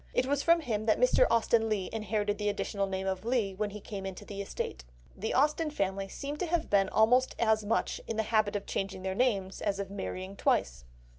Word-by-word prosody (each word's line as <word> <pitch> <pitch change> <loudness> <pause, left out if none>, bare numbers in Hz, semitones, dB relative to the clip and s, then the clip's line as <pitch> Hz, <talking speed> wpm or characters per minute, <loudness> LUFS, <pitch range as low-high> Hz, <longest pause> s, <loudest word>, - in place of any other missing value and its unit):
It 250 - +3
was 280 +1 +1
from 335 +2 +4
him 220 -6 -2
that 215 - +3
Mr. - - +5
Austen 225 -1 +3
Leigh 200 -4 0
inherited 210 -1 -1
the 210 0 +1
additional 200 -1 -2
name 190 0 -3
of 190 0 -2
Leigh 230 -4 0
when 210 +2 -2
he 210 +1 -8
came 200 -1 -7
into 190 -1 -6
the 200 -1 -6
estate. 65 - -5 0.3
The 220 +3 -3
Austen 300 +4 +2
family 195 -8 -2
seem 285 +8 -5
to 355 - -2
have 335 -1 -1
been 195 -1 +4
almost 250 +4 +3
as 220 -2 +2
much 210 +2 -1
in 225 - -3
the 220 - +2
habit 215 -2 +1
of 205 - -2
changing 195 -1 -3
their 190 0 -1
names 195 -4 0
as 200 -1 0
of 195 -1 -4
marrying 190 -1 -5
twice. - - 0
210 Hz, 220 wpm, -30 LUFS, 195-235 Hz, 0.3 s, Mr